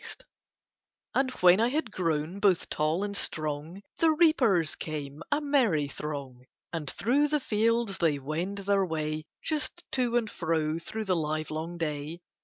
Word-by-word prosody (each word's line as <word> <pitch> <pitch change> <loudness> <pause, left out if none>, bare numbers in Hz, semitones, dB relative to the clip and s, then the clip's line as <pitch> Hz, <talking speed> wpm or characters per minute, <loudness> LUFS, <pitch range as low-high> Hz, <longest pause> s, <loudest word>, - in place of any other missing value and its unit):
And 265 -1 +2
when 180 +3 +7
I 230 - +4
had 270 -3 -1
grown 165 0 -1
both 195 -4 +3
tall 155 +5 0
and 205 0 -3
strong 155 +2 -3 0.2
The 330 - +5
reapers 260 - +4
came 150 -1 -5
a 290 - +3
merry 250 - +2
throng 140 -4 -6 0.3
And 155 -4 -3
through 275 +7 +2
the 300 0 +1
fields 230 -3 +1
they 160 -4 +3
wend 160 +8 -3
their 200 -1 +3
way, 155 -3 -2 0.2
Just 295 -5 -2
to 245 -2 +1
and 230 -2 0
fro 160 -4 -1
through 215 +6 -5
the 185 -2 +2
livelong 155 +1 -2
day. 155 +1 -3
175 Hz, 150 wpm, -29 LUFS, 155-230 Hz, 0.3 s, when